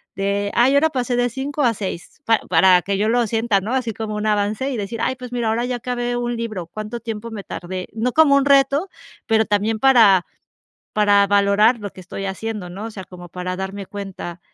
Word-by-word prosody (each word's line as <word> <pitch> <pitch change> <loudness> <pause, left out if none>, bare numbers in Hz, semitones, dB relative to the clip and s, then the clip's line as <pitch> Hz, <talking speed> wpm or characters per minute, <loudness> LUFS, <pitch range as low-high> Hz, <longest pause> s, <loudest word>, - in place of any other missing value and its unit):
de 200 +1 -1
ay, 250 +3 +4
ahora 310 +3 +4
pasé 250 -4 -2
de 245 0 +1
5 270 +4 -4
a 235 -3 +3
6, 195 - -7
pa 225 -1 +3
para 180 +1 +5
que 195 +2 -2
yo 210 +2 +1
lo 240 +1 +2
sienta, 225 -2 +1
¿no?, 215 +6 -4
así 250 -4 -1
como 215 0 -5
un 210 0 -3
avance 210 +5 0
y 270 - -3
decir: 215 +2 -5
"Ay, 260 - 0
pues 250 -1 -9
mira, 240 -2 -1
ahora 225 +2 0
ya 250 0 -2
acabé 245 0 -3
un 240 0 -2
libro, 215 -7 -5
¿cuánto 215 +6 -6
tiempo 230 0 -6
me 210 -3 -6
tardé?", 185 +1 -6
no 225 +3 -1
como 315 -3 +5
un 280 - +4
reto, 280 +5 +3 0.4
pero 220 -1 +3
también 210 +2 0
para 220 -8 +5 0.7
para 205 -1 +4
valorar 205 +4 +3
lo 205 -2 -6
que - - -14
estoy 190 +2 -6
haciendo, 200 -1 -5
¿no? 195 +5 -7
O 225 - -6
sea, 195 -3 -8
como 175 -1 -12
para 180 +1 -4
darme 195 +1 -5
cuenta 195 -4 -7
220 Hz, 220 wpm, -20 LUFS, 200-245 Hz, 0.7 s, para